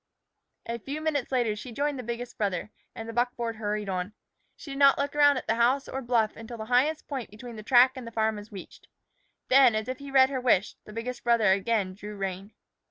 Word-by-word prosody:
A 235 0 -4
few 280 +6 -5
minutes 305 -5 -2
later 240 -5 +1
she 240 +4 -8
joined 285 +2 -2
the - - -5
biggest 240 +1 -5
brother, 200 -1 -2 0.2
and 225 - -7
the 230 - -6
buckboard 240 -1 -1
hurried 210 -1 -3
on. 185 +1 -3 0.4
She 285 - -10
did 275 - -5
not 275 -1 +6
look 280 +1 -2
around 290 -1 +5
at - - -5
the 225 - +1
house 250 +4 +2
or 265 - -4
bluff 235 -3 +1
until 230 +1 -9
the 220 - -6
highest 260 +7 +1
point 265 -6 -5
between 230 +3 -10
the 215 - -7
track 250 +3 +6
and 255 -3 -8
the - - -7
farm 220 -1 0
was 210 +1 -10
reached. 195 -3 -11 0.6
Then, 255 -3 +6
as 215 0 -2
if 255 0 -4
he 280 0 -9
read 265 0 +5
her 260 -2 -2
wish, 220 -6 +2
the - - -11
biggest 240 +3 -5
brother 235 -4 +4
again 195 -1 0
drew 210 +2 -9
rein. 195 +1 -5
235 Hz, 230 wpm, -27 LUFS, 215-260 Hz, 0.6 s, not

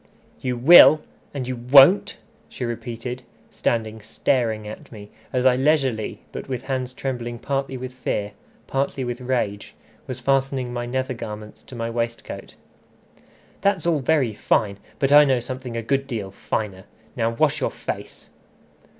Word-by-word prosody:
"You 125 -2 -2
will, 155 +3 +9 0.3
and 135 -3 -4
you 130 - -2
won't!" 135 +10 +6 0.3
she 125 - -5
repeated, 120 +1 -5 0.3
standing 110 -1 -2
staring 110 0 -1
at 105 - -10
me, 105 -2 -11 0.2
as 125 -1 0
I 130 -1 +6
leisurely, 130 -5 0
but - - -7
with 125 -1 -3
hands 130 -2 -3
trembling 120 -3 -4
partly 135 +1 -3
with 130 0 -7
fear, 105 -5 -3 0.3
partly 135 0 -2
with 120 0 -4
rage, 120 -5 -2 0.3
was 130 -1 -5
fastening 135 -1 0
my 120 0 -3
nether 130 +1 -2
garments 105 -2 -8
to 130 - -11
my 115 0 -3
waistcoat. 115 0 -5 1.1
"That's 195 -4 +1
all 165 -3 +2
very 135 -4 +1
fine, 100 -1 0 0.2
but 135 0 +1
I 145 +1 +9
know 135 -3 +2
something 125 0 -6
a 115 - -3
good 135 +3 0
deal 110 -7 -4
finer. 100 -1 -4 0.3
Now 115 -2 +1
wash 115 - +1
your - - +1
face." - - -7
125 Hz, 150 wpm, -23 LUFS, 115-135 Hz, 1.1 s, will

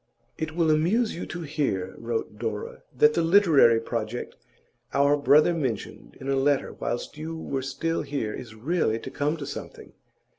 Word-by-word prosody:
'It 160 0 -4
will 165 -2 +3
amuse 190 +10 +2
you 170 - -5
to 175 - -6
hear,' 135 - -2
wrote 115 -2 -3
Dora, 110 -3 -4 0.2
'that 150 +3 +6
the 170 - +1
literary 165 - +5
project 115 0 -4 0.6
our 140 +1 +4
brother 150 +3 +5
mentioned 130 -10 -4
in 135 - -7
a 135 - +2
letter 135 +1 +1
whilst 120 +5 -4
you 160 +1 -5
were 135 -4 -3
still 135 +5 -2
here 125 -7 -3
is 115 -3 -8
really 120 -1 0
to 130 - -8
come 145 +4 -1
to 145 - -6
something. 145 - -8
140 Hz, 170 wpm, -26 LUFS, 120-160 Hz, 0.6 s, that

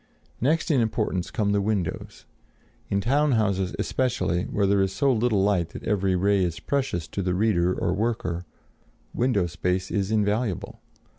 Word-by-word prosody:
Next 160 +7 +1
in 135 -5 +3
importance 105 -5 -1
come 105 -6 0
the 100 0 +2
windows. 100 -4 -3 0.6
In 100 0 +1
town 140 +6 +2
houses 100 -5 0
especially, 120 -9 0
where 100 - 0
there 100 0 +3
is 95 -1 +1
so 140 +5 +2
little 110 -4 +2
light 95 -5 +1
that - - -8
every 95 -3 +1
ray 100 +1 +2
is 85 -2 -2
precious 130 - -2
to 100 - -3
the 90 -1 0
reader 90 -4 +2
or 90 - -1
worker, 95 -5 -2 0.7
window 120 -7 +1
space 90 +2 -2
is 100 -2 0
invaluable. 105 -1 -1
100 Hz, 160 wpm, -25 LUFS, 90-115 Hz, 0.7 s, in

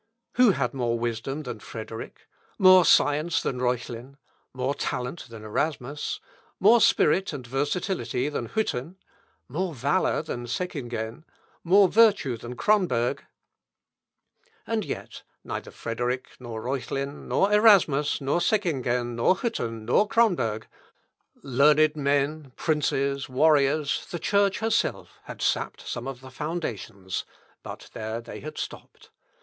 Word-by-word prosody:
Who 250 -5 +5
had 130 -7 -1
more 120 -3 -1
wisdom 120 +5 -3
than 125 - -6
Frederick? 110 0 -8 0.3
More 185 -2 +7
science 155 +3 +3
than 125 - -3
Reuchlin? 125 +1 -3 0.3
More 130 +2 -1
talent 125 +2 -4
than 115 -2 -10
Erasmus? 140 +5 -3 0.4
More 220 +4 +6
spirit 190 +3 +3
and 130 -4 -6
versatility 135 - -1
than 135 -6 -4
Hütten? 175 - -2 0.5
More 170 +4 -3
valour 145 +7 +1
than 120 -6 -5
Seckingen? 120 -6 -4 0.4
More 195 +3 +6
virtue 205 - +4
than 120 +2 -8
Cronberg? 170 - +1 1.5
And 225 -2 -1
yet, - - -6 0.2
neither - - -5
Frederick, 120 +2 -3
nor 115 -3 -7
Reuchlin, 135 +2 -4
nor 200 +1 +2
Erasmus, 185 -11 +5
nor 140 +4 0
Seckingen, 135 - 0
nor 120 +10 +3
Hütten, 115 - -3
nor 165 - +3
Cronberg.... 160 - +1 0.8
Learned 150 +3 +4
men, 145 -1 0
princes, 140 -3 0
warriors, 145 +1 +2
the 175 - -4
Church 200 +3 +1
herself, 225 0 -1
had - - -7
sapped - - -1
some 120 +2 -4
of 135 -2 -6
the 130 0 -12
foundations: 115 - -4 0.4
but - - -10
there 110 +1 -4
they 120 - -9
had 155 +2 -8
stopped. - - -8
140 Hz, 120 wpm, -26 LUFS, 120-175 Hz, 1.5 s, More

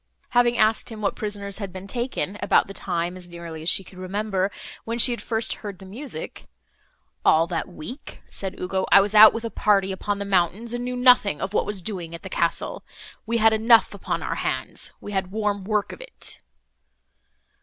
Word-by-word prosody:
Having 240 -1 +3
asked 215 0 +2
him 220 -2 -8
what 200 - 0
prisoners 200 -1 -3
had 200 -3 -5
been 185 +1 -8
taken, 240 -3 -3
about - - +4
the 195 - -9
time, 175 -1 -2
as 180 -1 -11
nearly 170 -2 -8
as 160 - -1
she 195 - +3
could 185 -1 -14
remember, 195 0 -1 0.3
when 230 +1 -3
she 240 +1 +5
had 235 -3 -3
first 225 0 -1
heard 205 -3 -6
the 190 - -12
music, 275 - -6 0.8
"All 160 +1 +5
that 170 -1 -3
week," 185 - -9
said 190 -1 -6
Ugo, 190 +1 -1
"I - - +9
was 200 +1 +1
out 215 0 +10
with 230 0 -5
a 230 - -4
party, 195 -2 +2
upon 200 +2 -2
the 200 - -4
mountains, 200 +4 +1
and 240 0 -3
knew 250 0 -3
nothing 245 - +4
of 190 +1 -4
what - - +1
was 200 -3 -2
doing 170 -5 -4
at 165 - -11
the 190 - -7
castle. 170 -2 -1 0.4
We 235 +1 +1
had 225 0 +5
enough 225 +1 +5
upon - - -3
our - - -3
hands, - - -3
we 205 - -8
had 190 -2 -1
warm 205 -1 -2
work 210 -1 0
of - - -11
it." - - -5
200 Hz, 205 wpm, -24 LUFS, 185-225 Hz, 0.8 s, out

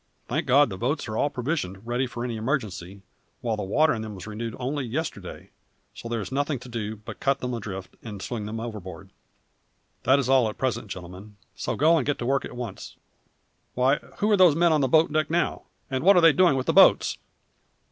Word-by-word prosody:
Thank - - -2
God, 140 +1 +5
the 95 - -6
boats 140 +6 -1
are 110 - -4
all 145 - +1
provisioned, 125 - -3
ready 120 +2 -1
for 120 0 -5
any 120 -2 -3
emergency, 100 - -3 0.4
while 115 -2 -1
the 105 - -5
water 150 +11 +2
in 110 - -4
them 110 -1 -6
was 95 - -9
renewed 110 +1 -5
only 135 +3 -2
yesterday, 120 - -5 0.4
so 115 - -8
there 115 -1 -1
is 100 - -7
nothing 145 +1 -1
to 125 +1 -12
do 110 -2 -4
but 105 0 -10
cut 135 -1 +1
them 125 -2 -4
adrift 100 -5 -6
and 105 -3 -8
swing 105 +1 -5
them 110 +1 -5
outboard. 105 -8 -8 0.9
That 130 - +4
is 140 -3 -1
all 130 -4 +4
at 105 - -8
present, 130 -4 -2
gentlemen, 95 +3 -9 0.2
so - - -3
go 160 +3 +4
and 140 - 0
get 145 - 0
to 120 - -4
work 135 +2 +1
at - - -9
once 120 -6 -7 0.8
why, 130 +3 +3 0.2
who 210 +1 +1
are 205 - +5
those 180 -5 +6
men 170 0 +4
on 150 - +2
the 135 - +2
boat 155 +3 +3
deck 155 -1 +1
now, 170 +2 -1 0.2
and 130 0 -3
what 195 +3 +7
are - - +6
they 165 -2 +7
doing 180 -5 +4
with 130 -1 -1
the - - +1
boats?" - - +5
125 Hz, 220 wpm, -25 LUFS, 110-145 Hz, 0.9 s, what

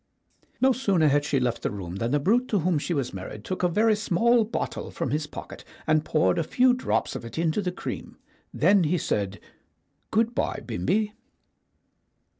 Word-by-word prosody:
No 265 +1 +5
sooner 195 - +2
had 145 +1 +3
she 145 -2 +1
left 125 -2 -1
the - - -1
room 95 -3 -6
than 115 +4 -1
the 145 +3 +2
brute 235 - +2
to 210 - +1
whom 170 -2 +1
she 160 - -4
was 135 -4 -2
married 100 +2 -7
took 185 - -3
a 180 - +4
very 215 +5 +3
small 225 +4 +3
bottle 220 +3 -4
from 125 - -3
his 150 +1 -1
pocket - - -9 0.2
and 155 -1 +3
poured 155 +1 +2
a - - +1
few 250 +9 +3
drops 255 - -1
of - - -5
it 115 - -9
into 165 +4 +1
the 180 -2 -2
cream. - - -6 0.3
Then 185 +2 +4
he 175 +4 +1
said, 100 - -2 0.7
"Good 230 +2 +1
bye, - - -1
Bimbi." 210 0 0
170 Hz, 190 wpm, -26 LUFS, 140-215 Hz, 0.7 s, No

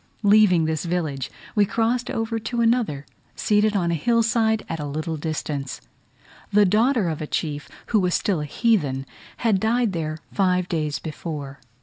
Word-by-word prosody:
Leaving 200 -5 +5
this 155 -1 -1
village, 155 -7 -2 0.2
we 210 - +4
crossed 235 +4 0
over 225 0 -2
to 235 +2 -3
another, 230 - +1 0.3
seated 210 0 +2
on 175 -3 +1
a - - +1
hill 230 +9 +2
side 220 -1 +1
at 165 - -4
a 150 - -3
little 155 +3 -3
distance. 150 -3 -4 0.7
The 205 0 +5
daughter 220 +2 +3
of 160 -2 -3
a 155 - -4
chief, 145 -2 -3 0.2
who 215 - +6
was 180 -2 +1
still 185 -7 0
a - - -3
heathen, 145 - +1 0.3
had 220 -5 +2
died 225 0 +1
there 155 -2 -3 0.2
five 180 -2 +2
days 155 -4 -1
before. 145 -3 -6
180 Hz, 165 wpm, -23 LUFS, 155-220 Hz, 0.7 s, who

